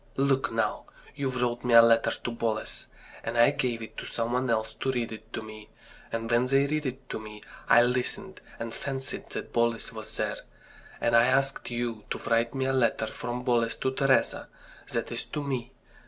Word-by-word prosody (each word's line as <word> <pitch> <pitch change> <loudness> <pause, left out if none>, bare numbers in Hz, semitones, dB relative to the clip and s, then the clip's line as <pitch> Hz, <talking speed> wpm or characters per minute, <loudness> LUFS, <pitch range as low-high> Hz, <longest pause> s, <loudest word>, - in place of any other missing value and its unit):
"Look, 135 -1 +2
now! 115 0 0 0.3
you 140 -1 -2
wrote 125 -1 -1
me 120 -2 +3
a 115 - +12
letter 115 0 +5
to 120 - -4
Boles, 115 -2 -2 0.4
and 115 +1 -3
I 120 +4 +7
gave 125 -5 -1
it 110 - -10
to - - -5
some 115 0 -2
one 125 0 +1
else 110 -1 0
to 135 - -1
read 120 -3 -2
it 110 0 -10
to 110 - -3
me; 110 -1 -10 0.4
and 115 0 -2
when 120 +2 +3
they 135 +1 +4
read 150 0 -1
it 130 +1 -6
to - - -3
me 105 -1 -10 0.3
I 120 - +8
listened 130 +11 -2 0.2
and 115 0 -5
fancied 135 0 -5
that - - -6
Boles 115 -1 +1
was - - -7
there. - - -1 0.6
And 115 0 +2
I 115 0 +7
asked 135 +1 +1
you 120 -3 -3
to - - -2
write 115 +2 +1
me 135 -1 0
a 135 - +1
letter 120 -3 +2
from 120 +2 -5
Boles 120 -2 +2
to 130 - -1
Teresa 135 0 +2 0.4
that - - -2
is - - -4
to 150 - -4
me. 130 -4 -3
120 Hz, 200 wpm, -28 LUFS, 115-130 Hz, 0.6 s, a